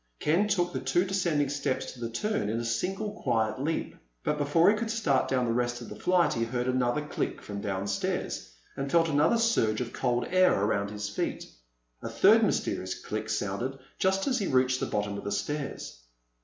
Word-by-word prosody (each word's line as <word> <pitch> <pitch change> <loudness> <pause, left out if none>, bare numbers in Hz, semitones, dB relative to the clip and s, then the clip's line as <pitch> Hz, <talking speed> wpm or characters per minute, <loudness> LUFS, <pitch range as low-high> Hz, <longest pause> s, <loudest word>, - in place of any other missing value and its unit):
Ken 170 +8 +2
took 175 -4 +1
the - - -1
two 175 +2 +1
descending 175 -7 +1
steps 140 -2 -2
to 125 - -13
the 115 -1 -3
turn 115 - -1
in 115 +2 -1
a 120 - -3
single 190 - -1
quiet 115 0 0
leap. 160 +3 -2 0.3
But 150 - 0
before 165 +6 +4
he - - +1
could 225 +1 -3
start 220 -12 +1
down 130 -2 +1
the 115 - 0
rest 120 0 0
of 120 - -9
the - - -7
flight 180 -1 +2
he 115 - 0
heard 120 +2 -2
another 130 +3 +1
click - - -3
from 100 -1 -6
downstairs, 100 - -2 0.2
and 135 0 -3
felt 165 -1 +4
another 150 +9 +3
surge 225 - +2
of 125 -2 -4
cold 120 -2 0
air 185 - +4
around 100 0 0
his 105 0 -4
feet. 100 - -3 0.6
A - - -5
third - - +5
mysterious 95 0 0
click 110 0 -5
sounded 110 +5 -2 0.2
just 190 +1 +2
as 260 -2 +1
he 200 - -1
reached 130 0 +2
the - - -1
bottom 105 -1 -2
of - - -9
the 100 - -3
stairs. 130 - -4
130 Hz, 200 wpm, -28 LUFS, 110-175 Hz, 0.6 s, third